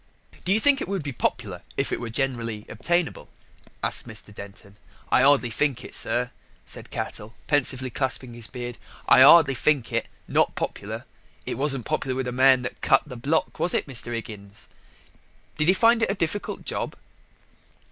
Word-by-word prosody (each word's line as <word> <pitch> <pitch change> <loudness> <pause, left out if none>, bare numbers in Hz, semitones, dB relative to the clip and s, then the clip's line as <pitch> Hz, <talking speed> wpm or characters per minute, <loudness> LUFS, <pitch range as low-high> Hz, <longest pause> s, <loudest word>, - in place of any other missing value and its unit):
"Do 180 - +1
you 210 - +4
think 285 +3 +4
it - - -3
would 195 -4 -2
be 140 - -4
popular 100 -6 -2 0.2
if 135 - 0
it - - -1
were 120 - -5
generally 115 -4 -2
obtainable?" 175 +8 -1 0.5
asked - - 0
Mr. 110 -2 -3
Denton. 100 0 -11 0.3
"I - - +5
'ardly 135 -3 +4
think 140 +1 -1
it, - - -10
sir," 125 +1 +1 0.3
said - - -8
Cattell, 110 +3 -5
pensively 130 -3 +1
clasping 130 -1 -1
his 115 -2 -1
beard. 120 -2 -7 0.3
"I - - +7
'ardly 145 0 +8
think 130 -1 0
it. 115 - 0 0.2
Not - - +2
popular: - - -5 0.4
it - - -3
wasn't 135 -2 0
popular 130 -1 -2
with 130 0 -2
the 125 - -3
man 130 0 +5
that 125 - -6
cut 135 - +4
the 135 -4 -9
block, 140 +7 -1
was 175 - +3
it, - - 0
Mr. 125 -3 -2
'Iggins?" 105 -3 -7 0.9
"Did 155 - +2
he 185 - +6
find 230 +2 +4
it - - +2
a 195 - 0
difficult 190 +2 -3
job?" - - -3
130 Hz, 180 wpm, -25 LUFS, 115-150 Hz, 0.9 s, ardly